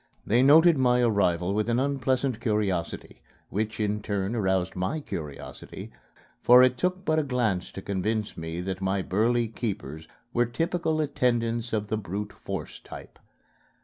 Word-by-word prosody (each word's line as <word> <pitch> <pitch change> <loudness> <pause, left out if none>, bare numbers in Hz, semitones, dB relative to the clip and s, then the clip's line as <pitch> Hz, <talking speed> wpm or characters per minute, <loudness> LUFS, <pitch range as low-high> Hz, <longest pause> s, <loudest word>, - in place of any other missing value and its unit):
They 120 +4 +3
noted 155 +3 +6
my 125 -1 +3
arrival 100 -5 +2
with 105 +2 0
an 120 +1 +2
unpleasant 130 -2 0
curiosity, 105 -7 -2 0.3
which 110 +3 -2
in 105 0 0
turn 100 +1 -2
aroused 95 -4 0
my 95 +13 -1
curiosity, 75 - -8 0.5
for 125 +1 +8
it 130 0 +4
took 185 +6 -2
but 155 0 +2
a - - +1
glance 120 -9 -1
to 95 - -9
convince 105 +2 -2
me 80 +1 -5
that 95 +1 -4
my 95 0 0
burly 115 +5 +1
keepers 100 - -5 0.3
were 120 0 +2
typical 160 +4 -1
attendants 120 -4 0
of 105 -1 -2
the 110 - 0
brute 105 +1 -5
force - - -6
type. - - -12
110 Hz, 150 wpm, -27 LUFS, 95-125 Hz, 0.5 s, for